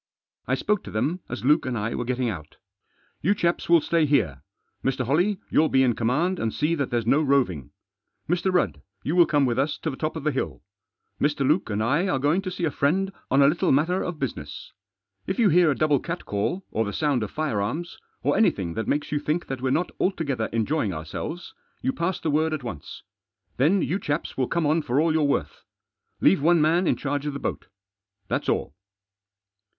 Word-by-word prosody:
I -, -, +2 dB
spoke 210 Hz, -2 st, 0 dB
to -, -, -7 dB
them 145 Hz, +12 st, -1 dB
as 120 Hz, +1 st, -5 dB
Luke 150 Hz, +4 st, +4 dB
and 125 Hz, -2 st, -2 dB
I 105 Hz, +2 st, -2 dB
were 120 Hz, -, -3 dB
getting 125 Hz, 0 st, -1 dB
out. 80 Hz, -9 st, -6 dB, 0.3 s
" -, -, -40 dB
You 200 Hz, +6 st, +2 dB
chaps 170 Hz, -2 st, 0 dB
will 170 Hz, -2 st, +6 dB
stay 165 Hz, -1 st, +2 dB
here. 95 Hz, -, +1 dB, 0.4 s
Mr. 130 Hz, -1 st, 0 dB
Holley, 175 Hz, -, +2 dB
you'll 155 Hz, 0 st, +4 dB
be 130 Hz, 0 st, +4 dB
in 125 Hz, -2 st, +3 dB
command 150 Hz, +12 st, 0 dB
and 115 Hz, -, -1 dB
see 150 Hz, +7 st, 0 dB
that 140 Hz, -5 st, -1 dB
there's 120 Hz, -3 st, -1 dB
no 140 Hz, +6 st, +3 dB
roving. 130 Hz, -, +1 dB, 0.6 s
Mr. 180 Hz, +3 st, +1 dB
Rudd, 80 Hz, -, 0 dB, 0.2 s
you 155 Hz, -, -1 dB
will 175 Hz, -2 st, +6 dB
come 145 Hz, -3 st, +3 dB
with 120 Hz, 0 st, 0 dB
us 145 Hz, +2 st, 0 dB
to 160 Hz, -, -3 dB
the -, -, -6 dB
top 155 Hz, +3 st, -3 dB
of 160 Hz, -, -5 dB
the 150 Hz, -, +1 dB
hill. 80 Hz, -, -3 dB, 0.6 s
Mr. 145 Hz, -2 st, +1 dB
Luke 155 Hz, -, +2 dB
and 105 Hz, +1 st, -1 dB
I 145 Hz, -, +1 dB
are 160 Hz, -, +1 dB
going 145 Hz, +7 st, +2 dB
to 190 Hz, -, -4 dB
see 180 Hz, -1 st, -5 dB
a 155 Hz, -, 0 dB
friend 190 Hz, +9 st, 0 dB, 0.2 s
on 140 Hz, +1 st, +5 dB
a -, -, +6 dB
little 170 Hz, +5 st, +2 dB
matter 165 Hz, +7 st, +2 dB
of 175 Hz, -2 st, -4 dB
business. 75 Hz, -, -5 dB, 0.6 s
If 190 Hz, -, -2 dB
you 225 Hz, -4 st, +4 dB
hear 175 Hz, 0 st, +5 dB
a 140 Hz, -, +2 dB
double 150 Hz, -2 st, +2 dB
catcall, 170 Hz, -, -3 dB
or 110 Hz, -, 0 dB
the 100 Hz, -1 st, -4 dB
sound 145 Hz, -5 st, +1 dB
of 105 Hz, -, -3 dB
firearms, 155 Hz, -, -3 dB, 0.2 s
or -, -, +2 dB
anything 95 Hz, -, +2 dB
that 110 Hz, +2 st, -3 dB
makes 145 Hz, 0 st, -1 dB
you 150 Hz, -, +1 dB
think 155 Hz, +4 st, -1 dB
that 135 Hz, -2 st, -5 dB
we're 130 Hz, -, 0 dB
not 165 Hz, +7 st, 0 dB
altogether 145 Hz, -, -1 dB
enjoying 115 Hz, -, 0 dB
ourselves, 85 Hz, -, -6 dB, 0.3 s
you 265 Hz, -, +1 dB
pass 185 Hz, -5 st, -1 dB
the 160 Hz, -, -1 dB
word 155 Hz, +2 st, +1 dB
at 150 Hz, -, -7 dB
once. 105 Hz, -, -8 dB, 0.5 s
Then 165 Hz, +9 st, +3 dB
you 185 Hz, +5 st, -1 dB
chaps 150 Hz, -2 st, -3 dB
will 130 Hz, -2 st, 0 dB
come 170 Hz, -1 st, 0 dB
on 155 Hz, +3 st, +2 dB
for 135 Hz, -2 st, 0 dB
all 160 Hz, +1 st, +3 dB
you're 160 Hz, -, +2 dB
worth. 140 Hz, -, -1 dB, 0.6 s
Leave 95 Hz, -, +4 dB
one 170 Hz, +3 st, +4 dB
man 165 Hz, +4 st, +3 dB
in -, -, +3 dB
charge 145 Hz, +1 st, -3 dB
of 145 Hz, -, -2 dB
the 140 Hz, -, -5 dB
boat; -, -, -4 dB, 0.6 s
that's -, -, -1 dB
all." -, -, -1 dB
145 Hz, 215 wpm, -25 LUFS, 125-170 Hz, 0.6 s, will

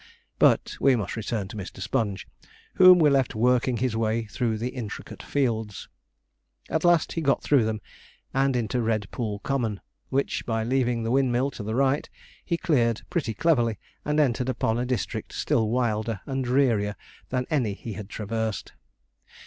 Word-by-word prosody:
But -, -, +3 dB
we 135 Hz, -2 st, +5 dB
must 105 Hz, -6 st, -3 dB
return 110 Hz, -3 st, -3 dB
to -, -, -9 dB
Mr. 100 Hz, -3 st, -7 dB
Sponge, 100 Hz, -4 st, -2 dB, 0.5 s
whom 185 Hz, -1 st, +8 dB
we 155 Hz, -4 st, +5 dB
left 135 Hz, -4 st, +2 dB
working 125 Hz, +2 st, +2 dB
his 125 Hz, -1 st, 0 dB
way 115 Hz, 0 st, 0 dB
through 110 Hz, +1 st, -2 dB
the 120 Hz, +3 st, -2 dB
intricate 125 Hz, -5 st, -7 dB
fields. 110 Hz, -7 st, -2 dB, 0.8 s
At 160 Hz, -, 0 dB
last 175 Hz, -2 st, +4 dB
he 165 Hz, -, -2 dB
got 140 Hz, -3 st, +1 dB
through 135 Hz, -6 st, +4 dB
them, 110 Hz, -1 st, -2 dB, 0.5 s
and 135 Hz, 0 st, +2 dB
into 120 Hz, 0 st, 0 dB
Red 110 Hz, -3 st, -1 dB
Pool 110 Hz, -4 st, -3 dB
Common, 115 Hz, -7 st, -1 dB, 0.3 s
which, 135 Hz, +1 st, -1 dB
by 115 Hz, -1 st, -1 dB
leaving 120 Hz, -1 st, +1 dB
the 115 Hz, -, -1 dB
windmill 130 Hz, 0 st, +2 dB
to 125 Hz, -, -8 dB
the 110 Hz, +2 st, -3 dB
right, 135 Hz, +2 st, +1 dB, 0.3 s
he 170 Hz, -, -1 dB
cleared 120 Hz, -9 st, +1 dB
pretty 135 Hz, -11 st, -1 dB
cleverly, 120 Hz, -7 st, +2 dB, 0.3 s
and 150 Hz, +1 st, 0 dB
entered 130 Hz, -3 st, +1 dB
upon 115 Hz, -2 st, 0 dB
a 125 Hz, -, -1 dB
district 125 Hz, -2 st, -3 dB
still 110 Hz, -2 st, +1 dB
wilder 110 Hz, -3 st, 0 dB
and 135 Hz, -1 st, -2 dB
drearier 120 Hz, -6 st, +2 dB, 0.3 s
than 125 Hz, -1 st, -1 dB
any 125 Hz, -9 st, +1 dB
he 110 Hz, +1 st, -7 dB
had 100 Hz, +1 st, -8 dB
traversed. 110 Hz, -1 st, -3 dB
120 Hz, 165 wpm, -26 LUFS, 110-135 Hz, 0.8 s, whom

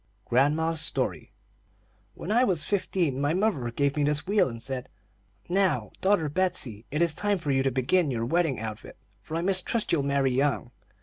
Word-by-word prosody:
GRANDMA'S 155 Hz, +5 st, +1 dB
STORY. -, -, -1 dB, 0.8 s
"When 190 Hz, -, -5 dB
I 240 Hz, +3 st, +4 dB
was 175 Hz, -, +2 dB
fifteen, 175 Hz, -8 st, -1 dB
my 145 Hz, +3 st, +1 dB
mother 185 Hz, -, 0 dB
gave 140 Hz, +4 st, 0 dB
me 150 Hz, -, +1 dB
this 145 Hz, +1 st, +1 dB
wheel, 205 Hz, -6 st, +2 dB
and 115 Hz, -1 st, -7 dB
said: 130 Hz, +1 st, -4 dB, 0.6 s
'Now, 190 Hz, +1 st, +1 dB
daughter 190 Hz, -5 st, +2 dB
Betsey, 145 Hz, -, -2 dB
it 150 Hz, +4 st, +1 dB
is 170 Hz, -2 st, +2 dB
time 205 Hz, +5 st, 0 dB
for 150 Hz, -5 st, -2 dB
you 135 Hz, -1 st, +2 dB
to 135 Hz, -, +2 dB
begin 135 Hz, +6 st, +1 dB
your 115 Hz, -3 st, -2 dB
wedding 160 Hz, -3 st, +1 dB
outfit, 110 Hz, -1 st, -7 dB, 0.2 s
for 160 Hz, -, -5 dB
I -, -, -1 dB
mistrust 195 Hz, +4 st, 0 dB
you'll 165 Hz, -, +2 dB
marry 140 Hz, -1 st, +1 dB
young.' 130 Hz, -1 st, 0 dB
150 Hz, 180 wpm, -27 LUFS, 135-180 Hz, 0.8 s, I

